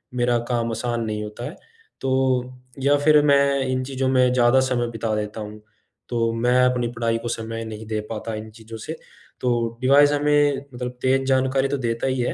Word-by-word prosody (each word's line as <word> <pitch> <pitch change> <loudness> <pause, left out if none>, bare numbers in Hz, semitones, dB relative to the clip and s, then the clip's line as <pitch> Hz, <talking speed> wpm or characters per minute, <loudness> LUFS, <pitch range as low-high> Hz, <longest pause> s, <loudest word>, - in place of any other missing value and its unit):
मेरा 120 -1 +2
काम 115 -1 0
आसान 120 +1 -2
नहीं 105 -1 -3
होता 105 +3 -7
है - - -11 0.5
तो 135 - -1 0.7
या 145 +1 +4
फिर 150 0 +5
मैं 140 -1 +4
इन 130 0 -1
चीज़ों 130 0 -1
में 125 -1 +3
ज़्यादा 125 +1 +4
समय 125 -2 0
बिता 115 -1 -2
देता 105 +1 -4
हूँ, 105 0 -8 0.5
तो 115 -1 0
मैं 125 +2 +2
अपनी 125 -1 +1
पढ़ाई 115 -1 0
को 120 - -6
समय 115 0 -4
नहीं 110 0 -7
दे 110 -1 -2
पाता 110 +1 -4
इन 110 +1 -7
चीज़ों 110 0 -10
से। 155 +9 -6 0.5
तो 115 -2 0
डिवाइस 145 +2 +5
हमें 145 -1 +3 0.2
मतलब 125 0 -4
तेज़ 135 +1 +2
जानकारी 130 0 +2
तो 140 - -1
देता 115 0 -2
ही 130 -1 -1
है 120 - -1
120 Hz, 195 wpm, -23 LUFS, 115-130 Hz, 0.7 s, फिर